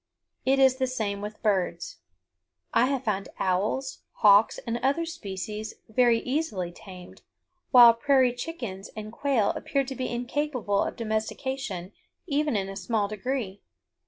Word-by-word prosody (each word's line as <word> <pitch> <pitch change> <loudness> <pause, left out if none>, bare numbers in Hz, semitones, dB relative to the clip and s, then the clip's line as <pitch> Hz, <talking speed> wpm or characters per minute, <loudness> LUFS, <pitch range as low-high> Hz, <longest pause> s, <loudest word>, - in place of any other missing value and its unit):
It 270 +1 +4
is 265 -1 +5
the 260 -1 0
same 215 -5 -3
with 210 +1 -7
birds. 185 -5 -1 0.8
I 250 - +4
have 270 -1 -1
found 200 -4 -2
owls, 205 +9 -1
hawks, 205 +1 +5
and 235 0 -2
other 280 +6 +1
species 215 - -6
very 235 0 +3
easily 250 - -2
tamed, 180 0 -12 0.5
while 240 -3 +9
prairie 260 0 +3
chickens 240 - -6
and 215 0 -7
quail 250 -4 +1
appear 275 -1 -1
to 265 0 -6
be 255 -1 -3
incapable 245 -4 -1
of - - -2
domestication 220 -3 -3 0.3
even 295 -2 0
in 195 -2 -1
a 195 - -7
small 205 +2 -1
degree. 215 -1 -4
230 Hz, 140 wpm, -27 LUFS, 200-265 Hz, 0.8 s, while